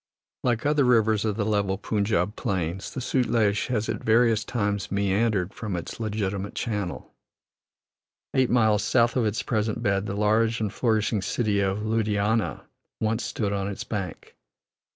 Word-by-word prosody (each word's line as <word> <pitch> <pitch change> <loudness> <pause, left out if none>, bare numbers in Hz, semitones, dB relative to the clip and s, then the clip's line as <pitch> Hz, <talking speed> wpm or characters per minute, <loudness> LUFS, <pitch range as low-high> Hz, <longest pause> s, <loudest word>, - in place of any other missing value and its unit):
Like 120 -1 0
other 145 -1 +3
rivers 110 -3 +3
of 105 -2 0
the 105 - 0
level 100 -2 +1
Punjab 105 -1 0
plains, 90 0 -2
the 130 - -5
Sutlej 115 -5 +1
has 110 -4 -1
at 110 -1 -3
various 115 -1 +3
times 100 -4 -2
meandered 100 -1 +1
from 105 -5 -4
its 85 - -6
legitimate 100 -3 -3
channel; 105 -6 -3 1.2
eight 130 -2 +3
miles 110 -4 +3
south 120 -2 +3
of 120 -4 +2
its 105 +3 -2
present 110 -2 -1
bed 100 0 +1
the 100 - -3
large 110 +2 +2
and 105 -3 -2
flourishing 110 -3 +1
city 105 -1 0
of 100 +1 0
Ludhiana 110 0 0 0.4
once 110 +1 0
stood 100 -3 -2
on 100 -1 -1
its 100 - -4
bank. 100 -4 -5
105 Hz, 150 wpm, -26 LUFS, 100-115 Hz, 1.2 s, other